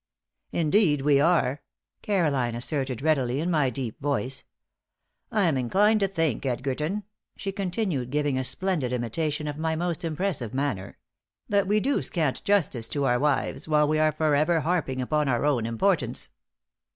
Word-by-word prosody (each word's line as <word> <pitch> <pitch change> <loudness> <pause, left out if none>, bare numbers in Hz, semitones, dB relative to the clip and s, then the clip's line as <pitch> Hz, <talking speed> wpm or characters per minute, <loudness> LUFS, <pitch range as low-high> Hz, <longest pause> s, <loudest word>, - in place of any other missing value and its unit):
"Indeed 160 -2 +2
we 145 -1 +4
are," 150 -4 +2 0.4
Caroline 145 - 0
asserted, 130 0 -1
readily, 135 -5 +1
in 170 +3 -1
my 150 -5 +2
deep 125 -1 -5
voice. 135 -2 -1 0.9
"I'm 185 - +2
inclined 205 - +3
to 200 - +2
think, 165 - -1
Edgerton," 140 - -2 0.3
she 195 - -3
continued, 185 - -2
giving 145 0 0
a 130 - 0
splendid 155 -4 0
imitation 150 +6 -2
of 150 0 -4
my 160 0 0
most 170 0 -2
impressive 155 - -2
manner, 135 -9 -2 0.5
"that 200 -1 +2
we 210 +2 +3
do 275 +6 +1
scant 155 -7 -1
justice 170 - +1
to 145 - -2
our 125 -1 +2
wives, 145 +2 0
while 150 -1 +3
we 155 +1 +1
are 155 0 +4
forever 155 +2 +2
harping 150 -6 -1
upon 150 +2 0
our 120 +2 +1
own 125 -6 +1
importance." 125 - 0
150 Hz, 150 wpm, -26 LUFS, 130-175 Hz, 0.9 s, we